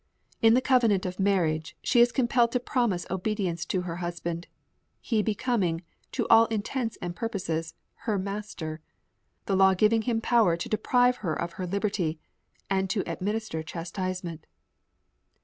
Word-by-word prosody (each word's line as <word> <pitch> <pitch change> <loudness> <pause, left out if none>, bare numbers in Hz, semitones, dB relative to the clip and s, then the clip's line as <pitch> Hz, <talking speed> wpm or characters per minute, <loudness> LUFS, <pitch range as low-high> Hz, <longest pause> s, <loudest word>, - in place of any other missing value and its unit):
In 225 0 +6
the 255 - +4
covenant 230 -8 +3
of 180 +1 -4
marriage, 170 -6 +1
she 245 - +3
is 240 0 +5
compelled 240 -2 +2
to 250 - +2
promise 240 -7 0
obedience 185 -3 -1
to 185 +2 -1
her 170 -2 -5
husband, 170 -1 -4 0.5
he 225 -4 0
becoming, 205 -6 0 0.3
to - - 0
all 225 0 +7
intents 225 +2 -2
and 175 -1 -4
purposes, 165 -7 -3 0.3
her 210 -2 +2
master 190 -5 -5 0.6
the 195 - +1
law 190 0 +5
giving 215 +4 +3
him 230 0 0
power 225 -7 +3
to 170 - -4
deprive 245 +3 +2
her 170 -6 -2
of 170 0 -3
her 180 - -2
liberty, 195 -4 -1 0.5
and 190 -1 0
to 195 +1 0
administer 210 -4 -2
chastisement. 175 0 -5
195 Hz, 150 wpm, -27 LUFS, 175-225 Hz, 0.6 s, all